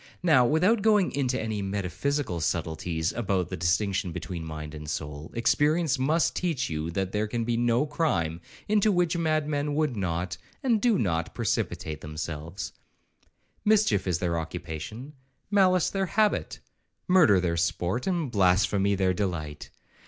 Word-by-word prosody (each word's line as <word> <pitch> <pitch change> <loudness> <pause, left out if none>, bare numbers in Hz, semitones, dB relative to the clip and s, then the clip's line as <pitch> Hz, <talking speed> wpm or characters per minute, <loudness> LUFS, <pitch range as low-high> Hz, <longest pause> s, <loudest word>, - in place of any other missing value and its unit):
Now, 130 -8 +5
without 185 - +3
going 210 -3 +3
into 130 -2 0
any 110 -2 -2
metaphysical 100 - -2
subtleties 80 0 -1
about 95 -6 -1
the - - -3
distinction 95 +2 0
between 85 0 -5
mind 75 -1 -7
and 75 -1 -7
soul, 75 0 -5
experience 145 +4 +2
must 155 +6 +2
teach 155 - -1
you, 80 +1 -2
that 95 +2 -2
there 105 +1 0
can 115 +2 -2
be 120 +1 0
no 120 +3 +2
crime 85 - -1 0.3
into 210 0 +3
which 175 -2 +1
madmen 150 -3 0
would 150 -5 +1
not, 90 -2 -2 0.3
and 235 -5 +2
do 235 -5 +3
not 85 - -1
precipitate 75 -1 -2
themselves; 80 +3 -6 0.9
mischief 210 - +3
is 90 -3 +1
their 85 -1 -1
occupation, 85 - -6 0.4
malice 185 -3 +4
their 195 -1 -1
habit, 210 +5 0 0.5
murder 160 - +6
their 85 -2 0
sport, 85 - -1
and 170 -8 -1
blasphemy 100 0 +3
their 95 -1 +2
delight. 85 -6 -3
105 Hz, 145 wpm, -27 LUFS, -, 0.9 s, murder